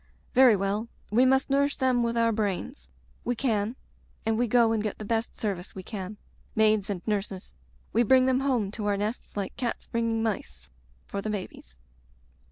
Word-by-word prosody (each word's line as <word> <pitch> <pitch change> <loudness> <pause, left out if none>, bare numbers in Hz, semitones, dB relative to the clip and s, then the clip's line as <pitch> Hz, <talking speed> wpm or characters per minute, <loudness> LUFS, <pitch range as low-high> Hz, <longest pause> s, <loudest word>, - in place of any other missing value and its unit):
Very 255 -3 +7
well; 200 +3 -1 0.2
we 245 +4 +5
must 265 +1 +3
nourish 280 +1 +3
them 255 -2 +2
with 235 0 0
our 230 0 +3
brains. 195 - -3 0.3
We 245 - -1
can. 225 -2 0 0.5
And 225 0 +2
we 240 +2 +1
go 230 0 +4
and 225 -1 +1
get 210 -1 -3
the 215 - -7
best 225 +2 -1
service 195 -4 -3
we 190 - -6
can, 200 0 -6 0.4
maids 215 -1 +3
and 190 -3 -3
nurses; 200 - -3 0.4
we 230 - +4
bring 255 +2 +5
them 260 0 +3
home 250 -8 0
to 210 -1 -4
our 200 -1 +2
nests 210 +1 -4
like 200 -2 -3
cats 240 -3 -3
bringing 230 -1 0
mice 65 - -3 0.2
— - - -33
^for 200 - -3
the 215 - -3
babies. 185 - -6
220 Hz, 185 wpm, -27 LUFS, 200-240 Hz, 0.5 s, Very